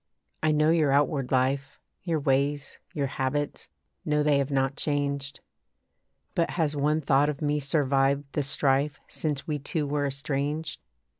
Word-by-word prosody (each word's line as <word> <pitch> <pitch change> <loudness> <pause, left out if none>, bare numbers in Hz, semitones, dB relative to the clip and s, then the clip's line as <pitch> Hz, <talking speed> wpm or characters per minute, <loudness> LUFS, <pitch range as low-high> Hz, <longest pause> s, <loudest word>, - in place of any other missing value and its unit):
I 155 - +3
know 155 +1 +3
your 155 -4 +3
outward 140 -1 +1
life 135 +1 0 0.2
Your 165 -4 -1
ways, 140 0 0
your 150 -6 -1
habits; 140 +2 -2 0.3
know 150 0 +1
they 145 -1 +3
have 140 0 -1
not 135 -1 +1
changed. 140 -2 -1 0.9
But 170 - +1
has 155 -3 +1
one 150 +2 +1
thought 140 +1 +3
of 145 -2 -3
me 150 -1 0
survived 140 -1 +2
the 150 - 0
strife 140 +1 +1
Since 150 -3 -2
we 150 -2 -2
two 150 +2 -2
were 145 0 0
estranged? 145 +2 -2
145 Hz, 150 wpm, -27 LUFS, 140-150 Hz, 0.9 s, I